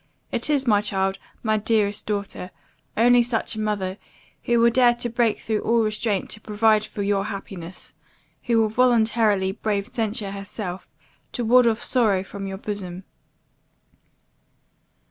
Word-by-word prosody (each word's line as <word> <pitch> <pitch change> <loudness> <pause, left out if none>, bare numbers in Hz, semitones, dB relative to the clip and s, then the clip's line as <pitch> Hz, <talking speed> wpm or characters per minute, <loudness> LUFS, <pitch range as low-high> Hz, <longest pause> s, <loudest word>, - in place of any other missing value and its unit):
It - - -1
is, 285 -3 +2
my 210 -4 +4
child, 195 -2 -1 0.2
my 215 -1 +2
dearest 210 -1 0
daughter, 200 -3 -3 0.5
only 245 +2 +6
such 235 -1 -1
a 215 - -5
mother, 205 -3 -2 0.5
who 235 -1 +3
will 235 0 +5
dare 245 -1 +4
to 240 0 -3
break 235 -2 +1
through 220 -1 -2
all 230 0 +2
restraint 215 -2 -1
to 215 - -4
provide 215 0 +2
for 205 -1 -5
your 200 0 +1
happiness 190 -4 -7 0.5
who 230 -1 +3
will 220 -1 +3
voluntarily 220 -4 +3
brave 200 -1 -2
censure 220 -5 -2
herself, 195 -1 -6 0.4
to 240 - -2
ward 245 +1 +6
off 225 0 0
sorrow 215 -7 +2
from 195 +1 -7
your 195 0 -5
bosom. 190 -3 -6
215 Hz, 145 wpm, -23 LUFS, 200-230 Hz, 0.5 s, only